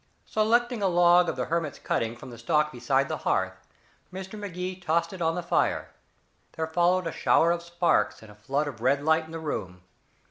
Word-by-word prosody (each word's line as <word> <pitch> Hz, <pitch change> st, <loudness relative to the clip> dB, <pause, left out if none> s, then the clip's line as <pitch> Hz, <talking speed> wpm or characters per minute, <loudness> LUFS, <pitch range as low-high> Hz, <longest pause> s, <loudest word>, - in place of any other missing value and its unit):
Selecting 235 Hz, +2 st, +1 dB
a 195 Hz, -, +3 dB
log 175 Hz, 0 st, +5 dB
of -, -, -2 dB
the 125 Hz, -1 st, -2 dB
hermit's 165 Hz, -3 st, -2 dB
cutting 115 Hz, 0 st, -2 dB
from 120 Hz, -, -11 dB
the 120 Hz, -, -10 dB
stock 150 Hz, +6 st, +1 dB
beside 135 Hz, +2 st, +1 dB
the -, -, -3 dB
hearth, -, -, -2 dB, 0.4 s
Mr. 190 Hz, +1 st, -7 dB
Magee 185 Hz, -3 st, -5 dB
tossed 170 Hz, +1 st, 0 dB
it 185 Hz, -, -8 dB
on 165 Hz, 0 st, +1 dB
the 180 Hz, -, -3 dB
fire. -, -, 0 dB, 0.6 s
There 160 Hz, -, -2 dB
followed 175 Hz, +3 st, +2 dB
a 165 Hz, -, -2 dB
shower 165 Hz, +2 st, +3 dB
of 170 Hz, 0 st, -1 dB
sparks 170 Hz, -, 0 dB
and 110 Hz, -, -13 dB
a -, -, -15 dB
flood 135 Hz, +8 st, -2 dB
of 125 Hz, -6 st, -7 dB
red 140 Hz, +3 st, +2 dB
light 160 Hz, +1 st, +3 dB
in 160 Hz, -, -13 dB
the 165 Hz, -, -5 dB
room. 90 Hz, -, -5 dB
165 Hz, 205 wpm, -27 LUFS, 135-180 Hz, 0.6 s, log